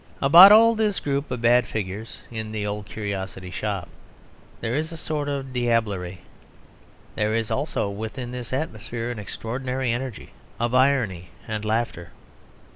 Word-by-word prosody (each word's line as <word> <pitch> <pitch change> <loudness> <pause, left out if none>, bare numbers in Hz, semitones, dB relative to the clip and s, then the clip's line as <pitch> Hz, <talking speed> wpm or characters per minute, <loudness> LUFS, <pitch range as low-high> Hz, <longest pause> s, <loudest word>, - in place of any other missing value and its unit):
About 170 +8 +10
all 225 +2 +8
this 215 -3 0
group 140 0 -2
of 125 -2 -4
bad 120 0 +5
figures 105 +1 -5
in 110 -2 -5
The 105 -1 -3
Old 105 0 -4
Curiosity 95 -3 -5
Shop 100 -3 -3 0.7
there 115 0 -2
is 155 +4 -1
a 165 - -7
sort 150 -2 -3
of 135 -2 -4
diablerie. 110 -7 0 1.0
There 110 +1 0
is 115 -1 -1
also 140 -6 -1
within 110 +5 -5
this 125 -1 -6
atmosphere 120 -4 -3
an 115 - -6
extraordinary 125 +4 -3
energy 120 -1 -5 0.3
of 120 +1 0
irony 125 -10 +2 0.2
and 110 -1 -3
laughter. 110 -6 -2
115 Hz, 145 wpm, -24 LUFS, 105-135 Hz, 1.0 s, About